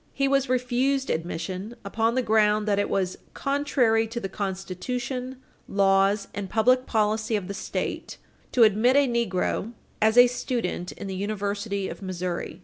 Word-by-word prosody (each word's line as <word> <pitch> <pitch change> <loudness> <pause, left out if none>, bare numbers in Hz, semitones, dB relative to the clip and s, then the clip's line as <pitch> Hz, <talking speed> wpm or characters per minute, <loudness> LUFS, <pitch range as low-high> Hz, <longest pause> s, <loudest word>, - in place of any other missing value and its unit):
He 275 0 +2
was 275 -1 +2
refused 255 +2 +1
admission 180 +6 -4
upon 225 +3 0
the 255 - +1
ground 215 -1 +3
that 200 -1 +2
it 205 - 0
was 185 -2 -1 0.2
"contrary 260 -6 +1
to 235 +2 -4
the 195 - -4
constitution, 240 +7 -4 0.3
laws 195 +1 +2
and 200 -2 -5
public 255 +5 +3
policy 215 0 +1
of 200 -4 -2
the 200 - -4
State - - -4 0.3
to 245 - +5
admit 220 +4 +4
a 285 -1 +5
negro 230 -1 -1 0.3
as 220 +2 +3
a 245 - +10
student 240 -7 -2
in - - -8
the 195 - -4
University 200 0 -2
of - - -8
Missouri." 180 -2 -4
215 Hz, 155 wpm, -26 LUFS, 195-245 Hz, 0.3 s, a